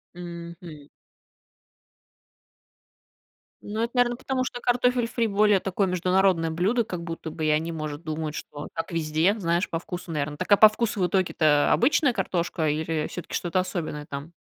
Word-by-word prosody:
Мгм. 170 -3 -9 2.8
Ну, 215 +2 -4
это, 235 - -1
наверное, 245 -1 +2
потому 260 0 -1
что 245 -1 -5
картофель 245 -1 +2
фри 230 0 0
более 205 -1 +3
такое 195 +1 0
международное 180 -2 +2
блюдо, 200 +9 +1
как 180 -6 -5
будто 165 -1 -6
бы. 160 -2 -3
И - - +2
они, 155 +2 +1
может, 155 0 -5
думают, 155 -1 -4
что 145 0 -7
так 165 +2 -4
везде, 165 +4 +1
знаешь, 170 0 0
по 165 - -2
вкусу, 175 0 -7
наверное. 150 -1 -2
Так, 175 - -5
а 200 - +8
по 215 - +10
вкусу 215 0 -2
в 180 - +2
итоге-то 155 -5 +2
обычная 275 +2 +3
картошка 175 -6 -1
или 155 +1 -1
всё-таки 180 - -8
что-то 180 +1 0
особенное 165 -5 -4
там? 145 +4 -7
175 Hz, 160 wpm, -25 LUFS, 160-205 Hz, 2.8 s, по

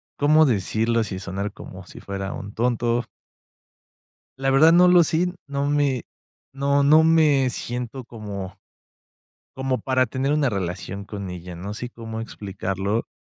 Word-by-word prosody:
¿cómo 155 +2 +5
decirlo 115 0 +1
sin 95 -2 -5
sonar 100 +1 -4
como 95 -1 -10
si - - -11
fuera 100 0 -5
un 100 +1 -8
tonto? 120 0 0 1.4
La 135 0 +1
verdad, 155 +5 +6
no 180 +1 +6
lo 175 -1 +6
sé, 165 +3 +1 0.2
no 140 0 -2
me 145 -4 +1 0.5
no 140 +1 +1
no 155 +3 +6
me 150 -5 +4
siento 125 +2 -5
como 100 -5 -7 1.0
como 130 -1 -1
para 130 -2 +1
tener 130 +4 -1
una 150 -3 +2
relación 95 0 -4
con 100 -2 -6
ella, 90 0 -8
no 100 +4 -6
sé 120 +3 -6
cómo 115 -1 -7
explicarlo. 100 0 -3
120 Hz, 145 wpm, -23 LUFS, 100-140 Hz, 1.4 s, verdad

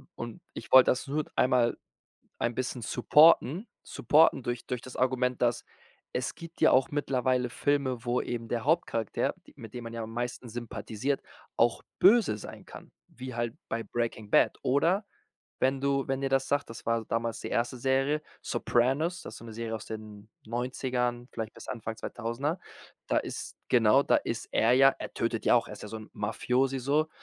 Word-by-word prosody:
Und 120 +9 -7
ich - - -9
wollte 130 -1 +8
das 130 +2 -2
nur 150 +2 -1
einmal 125 -2 +3 0.6
ein 120 - 0
bisschen 125 -1 -3
supporten 155 - +4 0.2
supporten 140 0 +3
durch 120 -1 -3
durch 125 -2 -3
das 130 - -10
Argument, 125 -1 +1
dass 120 -1 +1 0.5
es 125 - -2
gibt 165 0 -11
ja - - +6
auch 135 +5 +3
mittlerweile 130 -3 0
Filme, 135 -3 0
wo 120 +1 +1
eben 115 -1 -4
der 120 +1 -2
Hauptcharakter, 145 - 0
d - - -16
mit 115 -1 -11
dem 120 -1 -6
man 115 - -7
ja 115 -1 -4
am 110 - -7
meisten 120 0 -4
sympathisiert, 115 +3 -3 0.4
auch 115 0 +3 0.2
böse 200 - +5
sein - - -10
kann, - - -12 0.2
wie 130 -1 -8
halt 120 -1 -2 0.2
bei 115 0 -2
Breaking 115 -3 -3
Bad. - - +4
Oder, 170 +10 +2 0.6
wenn 135 +1 +2
du 140 -1 +1
wenn 135 0 -1
dir 135 - 0
das 135 0 +1
sagt, 145 -3 0
das 115 - -10
war 115 -1 +1
damals 115 0 -2
die - - -5
erste 125 +2 -1
Serie, 135 +4 +1 0.2
„Sopranos“, 145 +9 +1
das - - -8
ist - - -9
so - - -12
'ne 115 - -8
Serie 115 0 -4
aus 110 - -9
den 110 -1 -9 0.2
90ern, 125 0 -2
vielleicht 110 -2 -5
bis - - -12
Anfang 110 -2 -5
2.000er. 120 +10 -3 0.5
Da - - +1
ist - - -6
genau, 120 +3 +5
da - - +4
ist 115 0 -3
er 115 +2 +4
ja 135 +1 +7
er - - -6
tötet 115 -1 -1
ja - - +5
auch, 120 - +2
er - - -8
ist - - -12
ja 105 - -7
so 110 - -6
'n 110 - -12
Mafiosi 125 +5 0
so. 150 +4 +1
125 Hz, 190 wpm, -29 LUFS, 115-135 Hz, 0.6 s, wollte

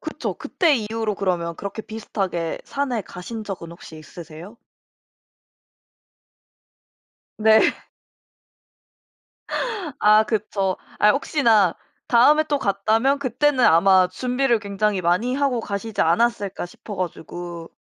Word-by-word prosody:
그쵸. - - -4
그때 325 -7 +1
이후로 220 -1 -3
그러면 170 -4 -2
그렇게 200 +2 -6
비슷하게 195 -7 -4
산에 270 -5 -2
가신 215 +5 -8
적은 180 -5 -7
혹시 170 -1 -12
있으세요? 170 +6 -11 2.8
네. 220 0 +5 2.4
아 215 +1 +5
그쵸. 210 -3 -1 0.2
아 210 - +5
혹시나 230 - +2 0.3
다음에 295 +6 +5
또 295 -2 -1
갔다면 220 +6 +1
그때는 265 0 +1
아마 185 +3 +5
준비를 250 +5 0
굉장히 205 -1 -1
많이 180 +9 +1
하고 275 -4 0
가시지 210 +1 -4
않았을까 200 +2 +1
싶어 205 +3 -10
가지고. 175 -1 -6
210 Hz, 240 characters per minute, -22 LUFS, 185-240 Hz, 2.8 s, 네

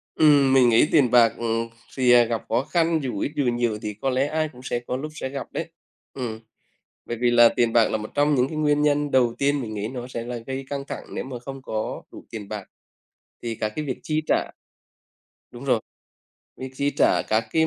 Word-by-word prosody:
Ừm, 145 -3 +5
mình 130 -2 +6
nghĩ 115 +5 +5
tiền 135 -7 +4
bạc, 120 -2 +6
ừm, 115 0 -1 0.3
thì, 125 -2 +4
à, 120 -1 +8
gặp 115 -1 -3
khó 115 +3 +1
khăn, 165 +1 +1
dù 125 -6 -3
ít 140 - -1
dù 145 - +1
nhiều 120 -3 0
thì 105 -2 -4
có 110 +6 -2
lẽ 130 +1 +1
ai 155 +1 -1
cũng 125 -3 -15
sẽ 120 - -2
có 125 +1 -4
lúc 155 +3 -6
sẽ 130 - -4
gặp 135 0 -5
đấy, - - -4 0.4
ừm. 115 -4 -5 0.7
Bởi 120 - -4
vì 120 -1 +3
là 120 -1 +7
tiền 120 -1 +1
bạc 115 -2 +5
là - - 0
một 110 0 -7
trong 145 +1 +3
những 125 0 +2
cái 155 - -6
nguyên 150 -1 +2
nhân 145 -1 +1
đầu 125 -3 +3
tiên 140 0 +1
mình 110 -3 -5
nghĩ 105 0 -3
nó 125 0 -6
sẽ 120 -2 -5
là 120 0 -5
gây 130 +3 -6
căng 140 -1 -3
thẳng - - -6
nếu - - -2
mà 130 -2 -7
không 135 +2 -8
có 110 -4 -4
đủ - - -12
tiền 105 -3 -7
bạc. 105 -3 -6 0.7
Thì 115 -1 -3
các 110 - -2
cái 155 - -3
việc 130 -3 -4
chi 155 0 0
trả - - +1 1.0
đúng 120 +2 -10
rồi, 125 -4 +2 0.8
việc 130 0 -7
chi 140 +2 0
trả - - +3
các 110 +1 +1
cái 160 0 +3
125 Hz, 235 wpm, -24 LUFS, 115-140 Hz, 1.0 s, à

